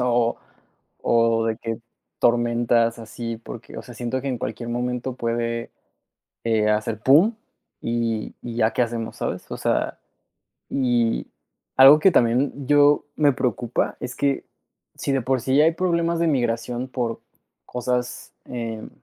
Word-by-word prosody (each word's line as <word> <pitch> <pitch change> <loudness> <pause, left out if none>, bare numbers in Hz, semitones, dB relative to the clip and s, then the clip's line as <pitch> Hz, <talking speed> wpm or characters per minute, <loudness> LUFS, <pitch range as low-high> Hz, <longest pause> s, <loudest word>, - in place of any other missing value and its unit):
o 120 -1 +2 0.7
o 115 -1 +3
de 110 -1 0
que 115 -1 -4 0.4
tormentas 120 -1 +2
así, 115 +1 -6
porque, 115 0 -10
o - - -7
sea, 125 - -12
siento 120 +2 -3
que 140 - -3
en 125 - -2
cualquier 115 +2 -5
momento 125 +1 -2
puede, 115 -1 -2 0.8
eh, 110 -2 +2
hacer 105 0 0
pum, 165 - +5 0.5
y 115 -2 -2
y 120 -1 -6
ya 110 -1 +3
qué - - +1
hacemos, 115 -1 -4
¿sabes? - - -4
O - - -4
sea, - - -1 0.7
y 120 -4 +1 0.5
algo 135 +3 +9
que 190 +3 +5
también 130 +2 +1
yo 145 0 +5
me 145 -2 +4
preocupa 120 -1 -1
es 125 0 -5
que, 140 -1 0 0.5
si 140 - -2
de 135 - +1
por 130 0 0
sí 135 +2 +2
hay 160 +2 +5
problemas 170 -1 0
de 170 - +2
migración 120 -2 -1
por 120 -3 -3 0.4
cosas, 125 0 -3
em, 115 -3 -5
120 Hz, 145 wpm, -23 LUFS, 115-130 Hz, 0.8 s, algo